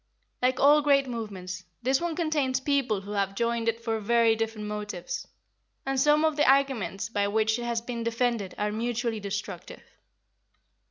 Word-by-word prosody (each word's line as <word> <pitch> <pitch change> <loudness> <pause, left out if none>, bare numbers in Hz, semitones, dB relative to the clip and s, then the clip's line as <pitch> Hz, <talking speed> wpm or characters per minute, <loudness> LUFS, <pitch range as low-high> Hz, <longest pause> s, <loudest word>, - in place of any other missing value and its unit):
Like 255 0 +2
all 295 +2 +6
great 280 -2 +4
movements, 190 -6 -6 0.2
this 265 +4 +2
one 340 -2 -2
contains 295 -6 0
people 265 -7 0
who 200 +1 -9
have 195 -1 -1
joined 235 0 0
it 230 0 -2
for 225 -1 -1
very 230 +1 +3
different 225 -1 -3
motives, 210 -4 -5 0.6
and 270 0 0
some 300 +3 +4
of 310 -1 +1
the 295 -3 +4
arguments 265 -7 +1
by 205 -2 0
which 220 +2 +1
it 240 - -4
has 235 -1 -1
been 235 0 -5
defended 230 -4 -1
are 210 0 -1
mutually 230 0 -2
destructive. 205 +1 -6
230 Hz, 165 wpm, -27 LUFS, 210-265 Hz, 0.6 s, all